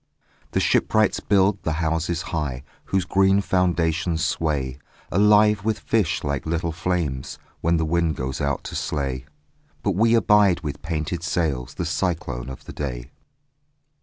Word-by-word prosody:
The - - +2
shipwrights 110 -1 +2
build 100 0 +2
the 80 - -1
houses 80 +2 -1
high, 70 -5 -2 0.2
Whose 95 -2 0
green 95 +1 +3
foundations 85 -3 +1
sway 70 -5 -1 0.3
Alive 105 +1 +5
with 110 0 0
fish 100 -6 0
like 70 0 -2
little 85 +1 -1
flames, 80 -6 -2 0.2
When 85 +1 +2
the 80 - 0
wind 85 0 +1
goes 65 +2 -4
out 70 -1 -1
to - - -7
slay. 65 -3 -2 0.6
But - - +2
we 115 +5 +3
abide 105 -5 +4
with 75 -3 -5
painted 80 +1 -3
sails 75 -6 -1
The 85 - -3
cyclone 80 -7 -2
of 65 - -9
the - - -9
day. - - -5
85 Hz, 145 wpm, -23 LUFS, 75-95 Hz, 0.6 s, Alive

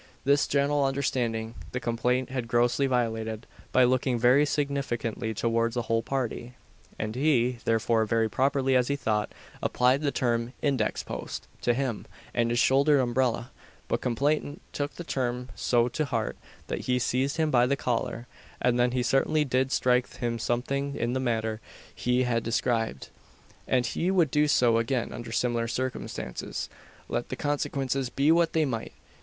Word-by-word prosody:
This 140 +1 +3
general 140 0 +2
understanding 120 -5 -1 0.2
the 125 - -1
complainant 125 +2 0
had 125 -3 -3
grossly 120 +3 +2
violated, 110 -3 -1 0.3
by 130 - +5
looking 130 0 +2
very 125 +5 +5
significantly 135 -6 -2
towards 115 +2 0
the 120 - 0
whole 115 0 +1
party; 125 -1 -3 0.4
and 110 0 -3
he, 125 -3 +2
therefore, 115 0 +2
very 115 +1 +2
properly, 135 +2 +1
as 125 -1 +3
he 140 - 0
thought, 110 -6 -1 0.3
applied 125 +3 +2
the 145 - +1
term 120 -1 0
"index 140 -3 0
post" - - -6
to 120 - +2
him 130 -4 -2 0.3
and 115 0 +1
his 120 - 0
shouldered 140 +4 +4
umbrella; 120 -1 0 0.4
but - - -1
complainant 145 +4 0
took 145 0 -3
the 175 - -6
term 125 -4 -2
so 120 +1 +2
to 155 +5 -1
heart 115 -5 -2 0.3
that - - -3
he 125 0 +2
seized 130 +3 0
him 160 -1 +1
by 125 -1 +4
the 140 +1 +1
collar, 120 -1 -2 0.3
and 125 0 +2
then 120 0 +3
he 125 -1 +1
certainly 150 +4 +2
did 130 0 +1
strike 125 -1 +2
him 120 -1 -2
something 140 +4 -1
in 120 +1 -1
the 130 - 0
manner 115 -3 -1 0.3
he 125 +1 +1
had 120 -2 +1
described; 115 - -1 0.6
and 125 -2 +2
he 170 +8 -1
would 175 -7 +3
do 150 0 +3
so 120 -5 +4
again 120 +1 -1
under 120 - -7
similar 120 -1 0
circumstances, 125 - -4 0.4
let - - -3
the - - -3
consequences 135 -3 -1
be 140 +5 +2
what 170 0 +3
they 160 -1 +3
might. 115 -5 -4
125 Hz, 165 wpm, -27 LUFS, 115-140 Hz, 0.6 s, by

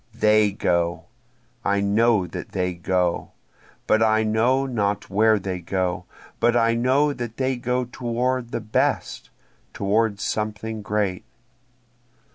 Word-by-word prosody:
they 105 -2 +4
go! 85 -3 0 0.6
I 100 0 +1
know 105 0 +3
that 85 - -8
they 90 -1 -1
go, 90 0 -1 0.5
but 110 - +3
I 110 0 +3
know 120 +5 +2
not 105 -7 -2
where 110 +2 +4
they 95 -2 -4
go, 90 +1 -2 0.3
But 120 +1 +3
I 115 0 +3
know 130 +5 +2
that 120 -4 -6
they 130 0 0
go 125 +1 -1
toward 125 0 -2
the 120 - -3
best 110 0 -1 0.4
toward 100 +1 0
something 110 +1 -3
great. 105 -1 -1
110 Hz, 125 wpm, -23 LUFS, 100-120 Hz, 0.6 s, they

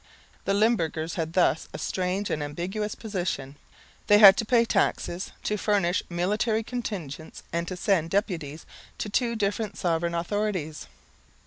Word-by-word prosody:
The 195 - +2
Limburgers 170 -7 +1
had 165 -2 -3
thus 170 -3 +2
a - - -3
strange 185 +2 -2
and 150 - -1
ambiguous 185 +8 -3
position. 175 - -3 0.5
They 205 - +7
had 200 -2 +10
to 225 - 0
pay 235 +1 +4
taxes, 190 -4 0
to 210 - 0
furnish 195 -4 +1
military 210 +6 0
contingents 185 - -6
and 170 0 -1
to 185 - -5
send 175 -4 +1
deputies 165 -6 -2 0.3
to 210 - -3
two 235 +2 +1
different 205 -1 -1
sovereign 170 0 0
authorities. 175 -3 -2
190 Hz, 140 wpm, -26 LUFS, 170-210 Hz, 0.5 s, had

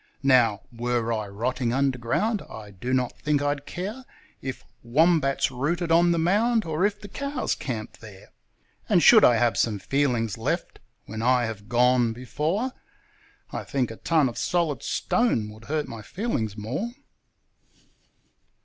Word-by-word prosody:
Now, 120 -7 +4
were 120 -1 -1
I 110 -2 -3
rotting 120 +4 -2
underground, 135 - 0
I 105 -2 -9
do 100 +6 -5
not 125 -2 0
think 150 -1 +1
I'd 145 0 -2
care 210 +9 -5 0.4
If 130 -1 -6 0.2
wombats 140 +2 +2
rooted 165 +7 -1
on 170 +1 +5
the 170 - +1
mound 215 +7 +2
or 160 +4 +2
if 205 0 -6
the 205 - -9
cows 280 +7 -2
camped 115 -5 -6
there; 105 -2 -13 0.6
And - - +4
should - - +8
I 120 - +7
have 120 0 +2
some 110 -3 +1
feelings 120 -3 0
left - - -2 0.3
when 110 +1 -6
I 125 0 +3
have 105 -2 -7
gone 120 -1 +3
before, 155 - -2 0.8
I - - -4
think 130 -4 -1
a 115 - -9
ton 160 -4 +2
of 120 - -5
solid 165 -7 0
stone 175 - 0
would 110 +1 -13
hurt 150 +2 -2
my 115 -2 -8
feelings 115 - -3
more. 120 - -3
130 Hz, 150 wpm, -25 LUFS, 115-165 Hz, 0.8 s, should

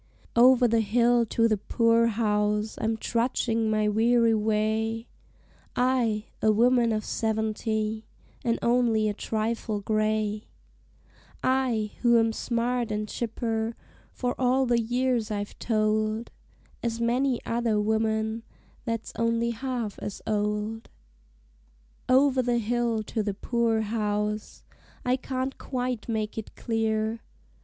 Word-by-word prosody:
Over 250 +1 +6
the 230 0 +2
hill 235 +2 +3
to 230 +2 +2
the 215 -2 +1
poor 230 +2 +3
house 210 -1 0
I'm 225 0 0
trudgin' 230 -1 0
my 215 -1 +1
weary 230 +2 +3
way 220 +1 0 0.7
I, 245 -4 +1 0.2
a 215 - +4
woman 235 +2 +3
of 215 -1 -1
seventy, 220 0 -1 0.4
and 235 -2 +1
only 235 -3 +3
a 210 - 0
trifle 220 0 -2
gray 215 0 0 1.0
I, 250 -5 +1
who 235 -1 +5
am 225 -1 +2
smart 240 0 -1
an' 210 0 -1
chipper, 225 0 -3 0.4
for 245 -1 -2
all 260 +1 +3
the 240 -1 +2
years 245 -1 0
I've 205 -1 -4
told, 215 0 0 0.5
As 230 -1 -2
many 245 +2 +1
another 230 -2 0
woman 220 +1 0 0.4
that's 230 -1 -3
only 230 0 +1
half 235 -3 -4
as 205 - -5
old. 210 +1 -2 1.2
Over 265 0 +4
the 245 -1 +1
hill 235 -1 0
to 220 +1 -2
the 205 -2 -2
poor 230 +1 0
house 210 -1 -2 0.4
I 250 +1 +3
can't 260 0 -4
quite 250 -3 -3
make 220 -1 -2
it 220 - -10
clear! 220 -1 -1
225 Hz, 120 wpm, -27 LUFS, 215-240 Hz, 1.2 s, Over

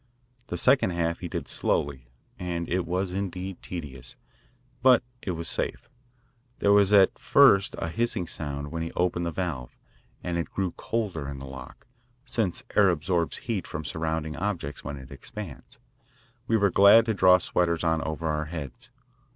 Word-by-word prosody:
The - - -3
second 130 -5 +4
half 85 0 -1
he - - -5
did - - -4
slowly, 65 -4 -1 0.3
and 85 -2 -3
it 90 -1 -1
was 90 +2 -1
indeed 95 -1 -4
tedious, 70 -8 -7 0.7
but 125 -1 +6 0.2
it - - -5
was 85 0 -5
safe. - - -3 0.7
There 100 - +3
was 100 -1 +5
at=20first 100 0 +5
a - - -3
hissing 110 0 -1
sound 70 -3 -5
when 85 0 -3
he 80 - -3
opened 85 -1 0
the - - -2
valve, 80 -9 -4 0.5
and 85 -1 -1
it 85 - -3
grew 95 -3 -2
colder 95 -12 -3
in 70 - -6
the 70 - -8
lock, 65 -1 -10 0.4
since 110 -8 -1
air 100 -2 +6
absorbs 85 0 0
heat 115 -6 -2
from 75 0 -5
surrounding 80 +1 -2
objects 90 -8 -3
when 70 +1 -5
it 65 0 -12
expands. 70 +2 -9 0.7
We 115 - +3
were 100 -3 +3
glad 100 +5 +7
to 115 - +1
draw 95 -2 +6
sweaters 85 -1 0
on 80 -1 +2
over 80 +1 -4
our 75 0 -1
heads. 80 - -7
85 Hz, 165 wpm, -27 LUFS, 75-95 Hz, 0.7 s, glad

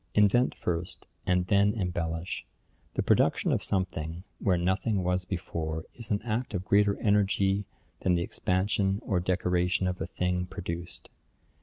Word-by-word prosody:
Invent 105 +5 +4
first, 85 0 -3 0.2
and 90 0 +3
then 100 +2 +3
embellish. 85 -3 -3 0.5
The - - +1
production - - +3
of - - +1
something, 85 -3 -2 0.2
where 95 -4 +2
nothing 95 +3 +1
was 90 +1 0
before, 80 -3 -3
is 115 -2 -7
an 105 -1 0
act 120 0 -2
of 90 +1 -3
greater 100 0 +4
energy 100 -1 +2 0.3
than 90 -1 +2
the 85 - +1
expansion 95 +2 +1
or 95 -4 +1
decoration 90 0 +1
of 90 0 -1
the 80 - -3
thing 90 0 -1
produced. 85 0 -6
90 Hz, 145 wpm, -29 LUFS, 90-100 Hz, 0.5 s, Invent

